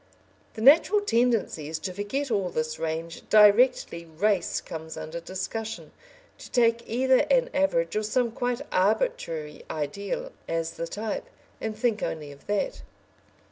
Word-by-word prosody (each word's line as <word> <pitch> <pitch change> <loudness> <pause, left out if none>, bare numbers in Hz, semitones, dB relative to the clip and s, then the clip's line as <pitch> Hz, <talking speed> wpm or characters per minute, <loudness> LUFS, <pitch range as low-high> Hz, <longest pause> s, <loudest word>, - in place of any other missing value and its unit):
The 220 - -6
natural 330 - +6
tendency 230 - +1
is 160 +1 -3
to 180 +4 -5
forget 240 +8 -3
all 195 -4 +1
this 155 -2 -3
range 165 +1 -3
directly 210 -4 +5
"race" 180 +4 0
comes 160 0 -8
under 165 +2 -5
discussion, 190 +6 -5 0.5
to - - -11
take 235 -2 +3
either 260 +2 +3
an - - +3
average 170 -14 +1
or 215 - +2
some 235 +2 0
quite 245 +2 -2
arbitrary 185 - 0
ideal 160 +7 -3 0.2
as 165 0 -1
the 165 - -5
type, 210 +4 -4 0.4
and 220 -1 -3
think 225 -2 0
only 150 -3 -4
of 140 0 -16
that. 205 - -1
210 Hz, 140 wpm, -27 LUFS, 165-245 Hz, 0.5 s, natural